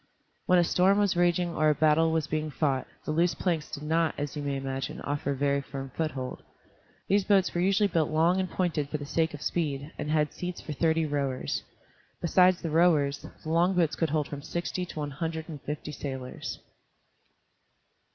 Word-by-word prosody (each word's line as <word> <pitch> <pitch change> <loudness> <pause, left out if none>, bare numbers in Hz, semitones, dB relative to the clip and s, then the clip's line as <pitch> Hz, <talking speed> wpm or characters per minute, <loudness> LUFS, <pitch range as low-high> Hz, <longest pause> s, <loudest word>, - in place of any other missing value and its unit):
When 180 - +5
a 175 - +5
storm 185 +3 +3
was 205 -3 +2
raging 175 0 +2
or 155 -1 +3
a 150 - +3
battle 160 +1 +4
was 160 -2 +1
being 155 0 -2
fought, 140 -3 0 0.2
the - - -2
loose 170 +2 +2
planks 165 -5 -1
did 145 - -6
not, 160 +1 +1
as 145 +1 -3
you 150 - -3
may 140 -1 -2
imagine, 135 0 -4
offer 145 0 -2
a 140 - +1
very 140 +1 +1
firm 135 -1 -7
foothold. 135 -5 -3 0.7
The 200 +1 +3
boats 195 -1 +3
were 175 - 0
usually 195 +3 +3
built 165 -5 +1
long 165 +4 +3
and 185 -1 -1
pointed 160 -6 -1
for 150 - -2
the 145 - -7
sake 160 +1 0
of 145 - -9
speed, 145 -3 -2
and 150 - -3
had 150 -1 +1
seats 180 0 -5
for 155 - -6
thirty 160 +1 +2
rowers. 140 -3 -1 0.6
Besides 180 +2 +4
the 165 - -2
rowers, 155 -4 +3 0.2
the 155 - -5
long 175 +3 +3
boats 165 -3 +2
could 165 - 0
hold 150 -1 0
from 145 -1 -6
sixty 175 +3 -3
to - - -10
one 145 -1 -3
hundred 160 +2 -4
and 150 -4 -8
fifty 150 +1 -5
sailors. 130 -3 -5
155 Hz, 200 wpm, -28 LUFS, 145-175 Hz, 0.7 s, When